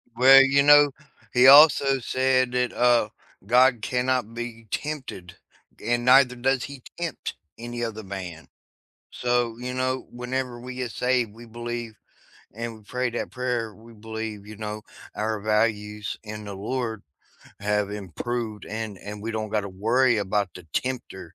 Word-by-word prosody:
Well, 135 Hz, +2 st, +8 dB
you 140 Hz, +1 st, +3 dB
know, 145 Hz, -1 st, +7 dB, 0.4 s
he 125 Hz, +1 st, +6 dB
also 140 Hz, -1 st, +8 dB
said 130 Hz, 0 st, +1 dB
that, 125 Hz, 0 st, 0 dB
uh, 120 Hz, -3 st, +3 dB, 0.4 s
God 125 Hz, 0 st, +4 dB
cannot 125 Hz, -2 st, -1 dB
be 115 Hz, -1 st, -7 dB
tempted, 130 Hz, -12 st, -5 dB, 0.5 s
and 120 Hz, 0 st, 0 dB
neither 125 Hz, -1 st, +6 dB
does 130 Hz, +1 st, 0 dB
he 140 Hz, -3 st, -10 dB
tempt 170 Hz, -4 st, -4 dB, 0.2 s
any 120 Hz, +1 st, -5 dB
other 110 Hz, -1 st, -4 dB
man. 90 Hz, -4 st, -7 dB, 0.6 s
So, 120 Hz, -2 st, 0 dB
you 125 Hz, +1 st, -5 dB
know, 130 Hz, 0 st, -2 dB
whenever 125 Hz, 0 st, -4 dB
we 125 Hz, +1 st, -8 dB
get 125 Hz, -2 st, -4 dB
saved, 125 Hz, -4 st, 0 dB
we 120 Hz, +1 st, -13 dB
believe 120 Hz, 0 st, -6 dB, 0.6 s
and 115 Hz, +1 st, -6 dB
we 105 Hz, -, -19 dB
pray 125 Hz, +3 st, -2 dB
that 120 Hz, -, -4 dB
prayer, 125 Hz, -4 st, -3 dB
we 115 Hz, +1 st, -16 dB
believe, 110 Hz, -1 st, -7 dB
you 110 Hz, -, -9 dB
know, 105 Hz, 0 st, -5 dB, 0.3 s
our 110 Hz, 0 st, -2 dB
values 105 Hz, -1 st, -1 dB
in 105 Hz, 0 st, -8 dB
the 100 Hz, -1 st, -7 dB
Lord 110 Hz, +1 st, -3 dB, 0.6 s
have 105 Hz, 0 st, 0 dB
improved 105 Hz, +3 st, -5 dB
and 110 Hz, -1 st, -5 dB
and 105 Hz, 0 st, -8 dB
we 115 Hz, -, -3 dB
don't 110 Hz, -1 st, -3 dB
got 105 Hz, -2 st, 0 dB
to 100 Hz, -, -6 dB
worry 115 Hz, +6 st, +2 dB
about 100 Hz, -1 st, -1 dB
the 90 Hz, -, -11 dB
tempter 120 Hz, -9 st, -4 dB
120 Hz, 155 wpm, -25 LUFS, 105-125 Hz, 0.6 s, Well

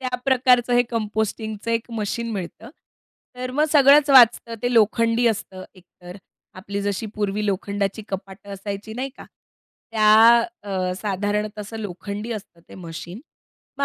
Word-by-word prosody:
त्या 255 Hz, -1 st, -2 dB
प्रकारचं 250 Hz, -2 st, +3 dB
हे 245 Hz, -, +5 dB
कंपोस्टिंगचं 220 Hz, 0 st, -3 dB
एक 230 Hz, +1 st, -2 dB
मशीन 230 Hz, +1 st, -3 dB
मिळतं. 205 Hz, +5 st, -7 dB, 0.7 s
तर 255 Hz, 0 st, -5 dB
मग 295 Hz, +4 st, +1 dB
सगळंच 285 Hz, 0 st, +6 dB
वाचतं. 240 Hz, -2 st, +6 dB
ते 245 Hz, -, 0 dB
लोखंडी 230 Hz, +2 st, +3 dB
असतं 190 Hz, -4 st, -2 dB
एकतर 180 Hz, 0 st, -14 dB, 0.4 s
आपली 200 Hz, +2 st, -5 dB
जशी 205 Hz, +2 st, -2 dB
पूर्वी 210 Hz, 0 st, -2 dB
लोखंडाची 200 Hz, +1 st, -2 dB
कपाटं 195 Hz, +1 st, -8 dB
असायची 200 Hz, +2 st, -6 dB
नाही 260 Hz, +2 st, -3 dB
का? -, -, -11 dB, 0.7 s
त्या 215 Hz, -1 st, +4 dB, 0.5 s
अ, 185 Hz, -2 st, -2 dB
साधारणतः 210 Hz, +1 st, -2 dB
असं 210 Hz, +2 st, -8 dB
लोखंडी 205 Hz, +3 st, -6 dB
असतं 195 Hz, -6 st, -9 dB
ते -, -, -13 dB
मशीन. 175 Hz, +3 st, -9 dB, 0.6 s
मग -, -, +1 dB
215 Hz, 140 wpm, -22 LUFS, 200-235 Hz, 0.7 s, सगळंच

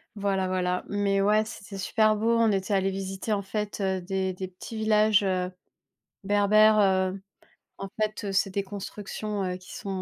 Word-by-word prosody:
Voilà, 195 Hz, -2 st, 0 dB
voilà 180 Hz, -1 st, -1 dB
mais 200 Hz, -1 st, +1 dB
ouais, 215 Hz, +2 st, +3 dB
c'était 200 Hz, -3 st, -9 dB
super 215 Hz, +3 st, +2 dB
beau, 230 Hz, +2 st, +1 dB
on 225 Hz, -2 st, +4 dB
était 195 Hz, +1 st, -1 dB
allés 195 Hz, 0 st, +2 dB
visiter 195 Hz, +2 st, -4 dB
en 200 Hz, -1 st, +1 dB
fait, 210 Hz, +1 st, -4 dB
heu, 190 Hz, -1 st, 0 dB
des 190 Hz, 0 st, -2 dB
des 185 Hz, +1 st, -5 dB
petits 185 Hz, +5 st, -10 dB
villages, 215 Hz, -1 st, +3 dB
heu, 185 Hz, -1 st, 0 dB, 0.7 s
berbères, 210 Hz, +2 st, +5 dB
heu, 190 Hz, -1 st, +2 dB, 0.6 s
en 195 Hz, -, -5 dB
fait, 215 Hz, -1 st, -1 dB
heu, 195 Hz, -, -3 dB
c'est 195 Hz, 0 st, +2 dB
des 200 Hz, +1 st, -1 dB
constructions, 205 Hz, +1 st, -5 dB
heu, 180 Hz, -1 st, -2 dB
qui 185 Hz, -, -12 dB
sont, 200 Hz, -, -7 dB
195 Hz, 180 wpm, -27 LUFS, 190-210 Hz, 0.7 s, berbères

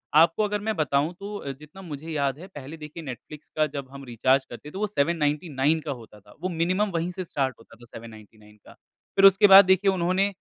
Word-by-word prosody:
आपको 165 Hz, +6 st, +5 dB
अगर 210 Hz, 0 st, -1 dB
मैं 220 Hz, +1 st, -2 dB
बताऊँ 150 Hz, 0 st, 0 dB
तो 200 Hz, -8 st, -6 dB
जितना 150 Hz, +7 st, -14 dB
मुझे 160 Hz, -3 st, -8 dB
याद 140 Hz, -3 st, -1 dB
है 185 Hz, -, -10 dB
पहले 150 Hz, -4 st, -10 dB
देखिए 155 Hz, +2 st, -9 dB
नेटफ्लिक्स 145 Hz, +2 st, -10 dB
का 155 Hz, -, +4 dB
जब 140 Hz, -2 st, -7 dB
हम 140 Hz, 0 st, -10 dB
रिचार्ज 130 Hz, +3 st, +1 dB
करते 145 Hz, +5 st, -10 dB
तो 190 Hz, -, -7 dB
वो 210 Hz, -, 0 dB
799 150 Hz, -3 st, 0 dB
का 150 Hz, -, -5 dB
होता 115 Hz, -5 st, -10 dB
था। 105 Hz, +1 st, -19 dB
वो 185 Hz, -, -2 dB
मिनिमम 185 Hz, +5 st, 0 dB
वहीं 170 Hz, +1 st, -1 dB
से 185 Hz, +1 st, -6 dB
स्टार्ट 135 Hz, -5 st, -2 dB
होता 115 Hz, -, -17 dB
था 120 Hz, +1 st, -16 dB
799 110 Hz, -2 st, -14 dB
का। -, -, -14 dB, 0.4 s
फिर 195 Hz, -, +5 dB
उसके 195 Hz, +1 st, +7 dB
बाद 195 Hz, 0 st, +11 dB
देखिए 190 Hz, +1 st, +3 dB
उन्होंने 185 Hz, +2 st, +1 dB
155 Hz, 215 wpm, -25 LUFS, 135-185 Hz, 0.4 s, बाद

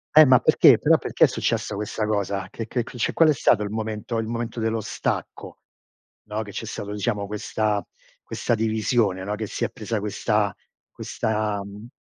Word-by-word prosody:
Eh, 155 Hz, -, +10 dB
ma 130 Hz, -3 st, +6 dB
perché? -, -, +6 dB
Però -, -, +4 dB
perché -, -, +3 dB
è -, -, +3 dB
successa 105 Hz, -, -1 dB
questa 105 Hz, +1 st, -3 dB
cosa? 100 Hz, -2 st, -1 dB
Che 115 Hz, -, -6 dB
che 120 Hz, 0 st, -1 dB
che 120 Hz, -, -11 dB
cioè 120 Hz, -, 0 dB
qual 165 Hz, -2 st, +5 dB
è -, -, +5 dB
stato 115 Hz, -5 st, +3 dB
il 105 Hz, -, -4 dB
momento 110 Hz, +2 st, -3 dB
il 110 Hz, -, -2 dB
momento 115 Hz, 0 st, -4 dB
dello 110 Hz, 0 st, 0 dB
stacco, -, -, -4 dB, 0.7 s
no, 105 Hz, +1 st, -3 dB
che 100 Hz, -, -10 dB
c'è 115 Hz, -, -5 dB
stato 105 Hz, -1 st, -6 dB
diciamo 105 Hz, -1 st, -2 dB
questa 105 Hz, 0 st, -1 dB, 0.4 s
questa 120 Hz, -, -1 dB
divisione, 110 Hz, -3 st, +1 dB
no, 105 Hz, +2 st, -2 dB
che 110 Hz, 0 st, -4 dB
si -, -, -4 dB
è -, -, +1 dB
presa 110 Hz, -2 st, -4 dB
questa 105 Hz, 0 st, 0 dB, 0.4 s
questa, 105 Hz, -2 st, -2 dB
mhmm, 100 Hz, +3 st, -10 dB
110 Hz, 190 wpm, -24 LUFS, 105-115 Hz, 0.7 s, Eh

